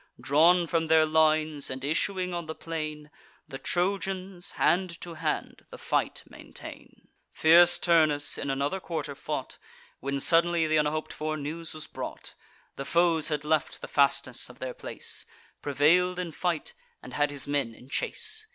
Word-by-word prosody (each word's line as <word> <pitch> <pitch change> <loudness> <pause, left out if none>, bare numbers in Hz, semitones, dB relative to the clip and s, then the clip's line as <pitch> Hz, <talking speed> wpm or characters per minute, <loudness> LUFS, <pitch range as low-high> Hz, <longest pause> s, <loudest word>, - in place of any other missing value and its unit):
Drawn 170 +5 +4
from 165 0 0
their 160 0 +5
lines, 155 -1 +2
and 130 0 -6
issuing 180 +5 0
on 170 -2 -4
the 160 - -5
plain, 155 -2 -5 0.4
The 135 - -8
Trojans 190 0 -2
hand 175 -1 +1
to 175 - -6
hand 160 - -3
the - - -10
fight - - -1
maintain. - - -12 0.2
Fierce 175 +2 +6
Turnus 155 -4 +3
in - - -4
another 140 +7 -1
quarter 165 -5 -4
fought, - - -5 0.4
When 140 +1 -2
suddenly 170 +1 +3
th' - - -4
unhop'd 150 +1 -1
for 155 0 -3
news 155 +3 -5
was 155 0 -4
brought, - - -7 0.4
The 140 - -4
foes 165 -1 +3
had 150 -2 -2
left 155 0 0
the - - -6
fastness 140 -3 +1
of 125 - -13
their 130 -1 -5
place, - - -5 0.3
Prevail'd 165 +6 +3
in 180 -2 -3
fight, 170 - -2 0.3
and - - -10
had 145 0 +1
his 145 -1 -2
men 140 -6 -1
in 125 - -16
chase. 435 - -3
155 Hz, 160 wpm, -28 LUFS, 145-175 Hz, 0.4 s, Fierce